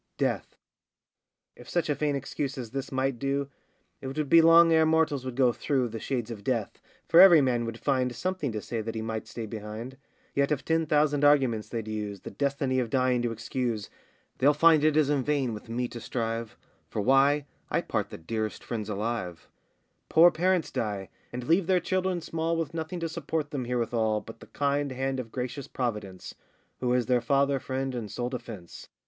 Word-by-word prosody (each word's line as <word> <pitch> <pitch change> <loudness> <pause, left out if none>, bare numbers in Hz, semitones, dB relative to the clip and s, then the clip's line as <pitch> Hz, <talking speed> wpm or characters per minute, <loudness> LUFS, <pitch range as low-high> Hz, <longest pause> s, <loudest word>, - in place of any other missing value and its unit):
DEATH. - - -1 1.0
If 120 - -14
such 175 -2 0
a 150 - +2
vain 145 0 0
excuse 135 0 -3
as 120 -4 -6
this 135 0 -4
might 130 -2 -1
do, 140 +1 -1 0.5
It 135 - -6
would 140 +1 -3
be 165 +2 +8
long 165 0 +7
ere 160 0 +5
mortals 155 -4 +2
would 130 -2 -5
go 125 -2 +3
through 130 -3 0
The 115 0 -6
shades 120 -3 -3
of 105 -3 -8
death; 115 -3 -2 0.3
for 165 - +6
every 180 -4 +9
man 125 -4 +1
would 115 0 -5
find 130 -2 0
Something 180 -2 -2
to 105 - -4
say 115 -2 -3
that 115 +1 -5
he 110 - -3
might 110 -1 -4
stay 115 - -6
behind. 110 +4 -7 0.4
Yet, 140 +1 +1
if 145 -2 -1
ten 160 0 +1
thousand 150 -1 +2
arguments 130 -7 +3
they'd 115 -2 -4
use, 105 -3 -4
The - - -8
destiny 140 -2 0
of 120 -3 -1
dying 125 0 +2
to 120 -1 -1
excuse, 115 -1 -3 0.5
They'll 145 +3 +4
find 160 0 +5
it 155 -1 +3
is 150 -2 +3
in 145 -2 +2
vain 140 -5 0
with 105 +1 -9
me 120 +2 -1
to 120 - -8
strive, 115 -2 -3 0.3
For - - -4
why, 135 +5 +4 0.2
I - - +1
part - - -2
the - - -8
dearest 110 +5 -4
friends 110 -3 -4
alive; 105 -5 -3 0.6
Poor 170 +2 +7
parents 180 0 +1
die, 100 -4 -3 0.2
and 125 0 -5
leave 165 +6 +2
their 185 -1 +4
children 185 -1 -1
small 165 +1 -2
With 165 -1 -3
nothing 165 +2 -4
to 165 - -1
support 160 -2 -3
them 135 -5 -3
here 125 +1 -1
withal, 110 -2 0
But 115 - -12
the - - -13
kind 140 0 -1
hand 135 +1 -2
of 115 -3 -6
gracious 125 +2 -4
Providence, 105 -7 -4 0.5
Who 125 -1 0
is 125 -1 +2
their 125 -1 +2
father, 140 +3 +2
friend, 130 0 -3
and 115 -4 -4
sole 120 +4 -3
defence. 110 -8 -8
130 Hz, 200 wpm, -28 LUFS, 115-145 Hz, 1.0 s, every